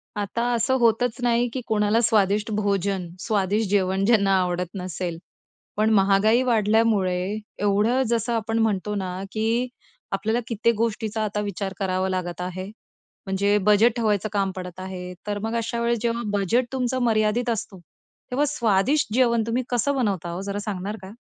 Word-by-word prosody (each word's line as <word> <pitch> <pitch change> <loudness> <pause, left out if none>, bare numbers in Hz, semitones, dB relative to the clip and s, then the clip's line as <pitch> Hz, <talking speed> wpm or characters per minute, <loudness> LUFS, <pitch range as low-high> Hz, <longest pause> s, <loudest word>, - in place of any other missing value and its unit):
आता 205 +3 -2
असं 260 +3 +1
होतच 235 0 +2
नाही, 240 0 +2
की 260 - -3
कोणाला 215 +1 +2
स्वादिष्ट 210 -1 +2
भोजन, 200 -3 0
स्वादिष्ट 205 -1 0
जेवण 195 -1 +1
ज्यांना 200 -3 +4
आवडत 180 0 -1
नसेल. 180 -2 -4 0.6
पण 215 +1 +3
महागाई 200 +4 +4
वाढल्यामुळे 210 -4 +2 0.2
एवढं 210 +5 +2
जसं 235 0 0
आपण 225 0 -1
म्हणतो 210 -2 0
ना, 185 -1 -4
की 225 +3 0 0.4
आपल्याला 215 +4 0
कित्येक 230 0 +1
गोष्टींचा 220 0 -1
आता 210 -1 -2
विचार 200 -1 -4
करावा 190 -1 0
लागत 180 -1 -3
आहे. 185 +1 -4 0.6
म्हणजे 200 +1 +2
बजेट 210 +3 +4
ठेवायचं 215 -3 0
काम 195 -2 +1
पडत 180 -1 -7
आहे. 185 -1 -6
तर 205 0 -2
मग 225 +1 -2
अशा 230 0 -2
वेळेस 235 0 +1
जेव्हा 235 0 0 0.2
बजेट 230 +6 +1
तुमचं 255 0 -1
मर्यादित 225 +1 +1
असतो. 205 -4 -3 0.5
तेव्हा 280 +4 +2
स्वादिष्ट 235 -1 +1
जेवण 235 -2 +3
तुम्ही 240 +3 0
कसं 255 +3 +1
बनवता 200 -9 -1
हो, 175 +2 -4
जरा 200 +1 -3
सांगणार 205 0 -4
का? 190 0 -10
210 Hz, 155 wpm, -24 LUFS, 195-230 Hz, 0.6 s, ज्यांना